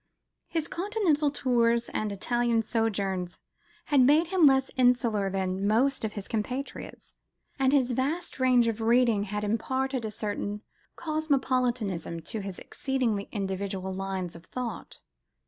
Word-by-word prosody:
His 325 -1 -1
Continental 350 -6 +1
tours 235 -4 +2
and 215 -1 -2
Italian 235 +3 +1
sojourns 195 -5 -1 0.5
had 285 -3 +4
made 295 +6 +5
him 360 -5 +5
less 265 -1 +3
insular 235 -5 +2
than 190 0 -1
most 255 +6 +2
of 215 -1 -2
his 205 -2 -6
compatriots, 250 +5 -5 0.5
and 265 -1 +3
his 260 -3 +3
vast 275 +7 -2
range 250 -2 +4
of 225 -1 -2
reading 230 -2 +3
had 210 +1 -3
imparted 260 +4 -1
a 220 - -2
certain 210 0 -4 0.3
cosmopolitanism 255 - -1
to 215 +7 -5
his 195 -2 -6
exceedingly 245 -7 -2
individual 190 -2 -3
lines 190 -2 -4
of 170 0 -12
thought. 245 -3 -6
230 Hz, 130 wpm, -28 LUFS, 200-265 Hz, 0.5 s, made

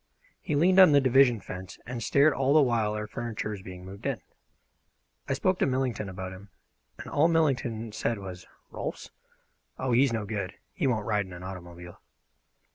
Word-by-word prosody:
He 150 - -2
leaned 180 +6 +4
on 185 -6 +9
the 140 - +7
division 130 -4 +4
fence 90 0 -8
and 120 0 -5
stared 140 +6 +4
all 135 +2 +2
the 155 - +7
while 115 -4 +1
our 105 0 -3
furniture 110 0 -4
was 100 -2 -6
being 90 -1 -10
moved 95 +1 -7
in. - - -1 1.1
I - - +2
spoke 185 +7 +1
to - - +3
Millington 130 -6 -1
about 95 0 -6
him, 100 +2 -12 0.5
and - - -9
all 150 +3 +3
Millington 125 -9 0
said 115 +1 -1
was: 95 -2 -9 0.2
"Rolfs? - - -6 0.7
Oh, 130 -1 -2
he's 130 +2 +4
no 110 -2 -2
good! 100 -2 -4 0.2
He 160 -8 0
won't 110 -5 0
ride 105 -3 0
in 90 - -11
an 90 +1 -9
automobile." 90 -2 -9
115 Hz, 185 wpm, -28 LUFS, 95-135 Hz, 1.1 s, on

